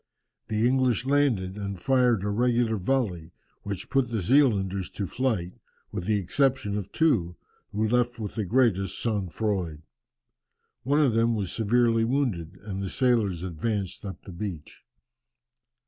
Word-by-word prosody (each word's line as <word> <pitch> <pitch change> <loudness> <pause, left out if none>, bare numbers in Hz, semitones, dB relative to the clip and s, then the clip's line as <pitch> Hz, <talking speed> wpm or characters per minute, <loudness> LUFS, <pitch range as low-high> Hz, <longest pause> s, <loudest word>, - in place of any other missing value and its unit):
The 110 +2 +1
English 130 -2 +2
landed 125 -10 +1
and 100 -2 -4
fired 125 -1 +3
a 105 - -1
regular 120 0 +2
volley, 95 -7 -1 0.3
which 100 +1 -6
put 135 -2 +2
the 115 -2 -1
Zealanders 100 -6 +2
to 100 - -3
flight, 105 -6 -1 0.4
with 90 - -4
the 105 0 +2
exception 120 +2 +1
of 100 -2 -4
two, 110 - +2 0.4
who 110 +2 0
left 120 +1 +1
with 105 -3 -5
the 110 - -2
greatest 100 -4 +1
sang 105 -5 -1
froid. 90 -6 -2 1.0
One 145 +4 +2
of 135 -6 +3
them 115 +1 +2
was 100 -5 -2
severely 115 +1 +2
wounded, 115 - -1
and 100 -2 -5
the 95 - -3
sailors 110 -9 +1
advanced 95 +2 -3
up 95 -2 -6
the 95 - -10
beach. 85 -4 -6
110 Hz, 145 wpm, -27 LUFS, 95-125 Hz, 1.0 s, fired